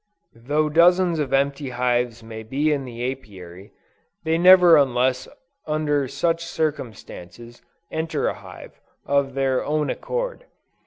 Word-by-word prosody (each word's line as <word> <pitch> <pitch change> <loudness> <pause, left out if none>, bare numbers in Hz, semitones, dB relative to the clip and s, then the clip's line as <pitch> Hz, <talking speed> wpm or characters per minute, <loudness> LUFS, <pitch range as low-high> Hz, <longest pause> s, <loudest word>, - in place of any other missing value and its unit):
Though 145 +7 -1
dozens 170 +2 +3
of 145 - -2
empty 140 0 0
hives 120 -2 -1
may 110 0 -8
be 140 +7 0
in 140 -2 -3
the 120 +1 -4
Apiary, 95 -6 -12 0.5
they 160 0 0
never 180 -1 +7
unless 130 -2 +1 0.4
under 150 -2 0
such 165 +5 -1
circumstances, 120 - -6 0.3
enter 160 +1 -2
a - - -1
hive, - - -13 0.2
of 140 -1 0
their 135 -1 0
own 150 0 -1
accord. - - -4
140 Hz, 125 wpm, -22 LUFS, 125-160 Hz, 0.5 s, never